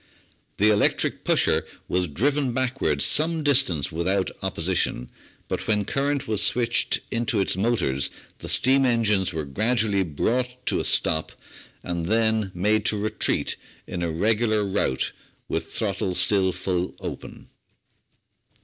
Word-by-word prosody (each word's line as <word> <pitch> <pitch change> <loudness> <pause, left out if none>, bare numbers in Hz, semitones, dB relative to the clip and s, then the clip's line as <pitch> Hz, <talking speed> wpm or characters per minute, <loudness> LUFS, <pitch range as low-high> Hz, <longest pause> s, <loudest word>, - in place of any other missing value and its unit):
The 105 +2 +4
electric 105 -1 +1
pusher - - +2 0.2
was 90 0 0
driven 135 - 0
backwards 130 +1 0
some 160 +1 +1
distance 125 - +2
without 90 +4 0
opposition, 90 -8 -1 0.4
but - - -4
when 105 -2 +1
current 140 +2 -1
was 105 -2 0
switched 120 0 +2
into 115 -2 0
its 95 - +1
motors 90 - 0 0.3
the - - -8
steam 135 +2 +3
engines 105 -7 +2
were 80 -3 -4
grad 110 - -1
ually 100 -3 +2
brought 125 - -2
to - - +1
a - - -1
stop 80 0 +1 0.5
and 85 -1 -3
then 110 -1 +1
made 105 +4 +1
to 105 - +1
retreat 110 +1 0 0.3
in 90 - -5
a 85 - -1
regular 110 +5 +1
rout, 95 -9 -1 0.4
with 80 0 -4
throttle 95 -4 -2
still 95 -1 +3
full 90 0 -3
open. - - -8
105 Hz, 135 wpm, -24 LUFS, 90-120 Hz, 0.5 s, The